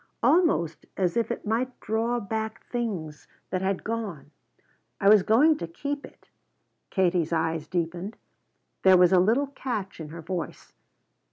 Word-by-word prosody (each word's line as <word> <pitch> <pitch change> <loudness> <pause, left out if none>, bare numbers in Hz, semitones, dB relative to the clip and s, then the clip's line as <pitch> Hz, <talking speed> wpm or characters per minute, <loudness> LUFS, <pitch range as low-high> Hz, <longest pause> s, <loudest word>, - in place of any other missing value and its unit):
Almost 305 - +2
as 180 -3 +1
if 235 - +1
it - - -4
might 240 +4 -1
draw 230 +3 0
back 220 +1 -4
things 190 - -4 0.2
that 185 0 -1
had 190 0 -1
gone. 200 -11 -4 0.7
I 195 - +2
was 210 0 +8
going 280 +11 +4
to 170 - -5
keep 285 - -4
it - - -23 0.3
" - - -49
Katie's 180 -4 +1
eyes 160 -1 0
deepened, 175 +4 -3 0.6
there 190 -1 +7
was 180 -1 +6
a 185 - +7
little 225 +10 +3
catch 245 -9 -5
in 155 -2 -7
her 165 +1 -9
voice. 175 +1 -5
195 Hz, 155 wpm, -27 LUFS, 170-230 Hz, 0.7 s, was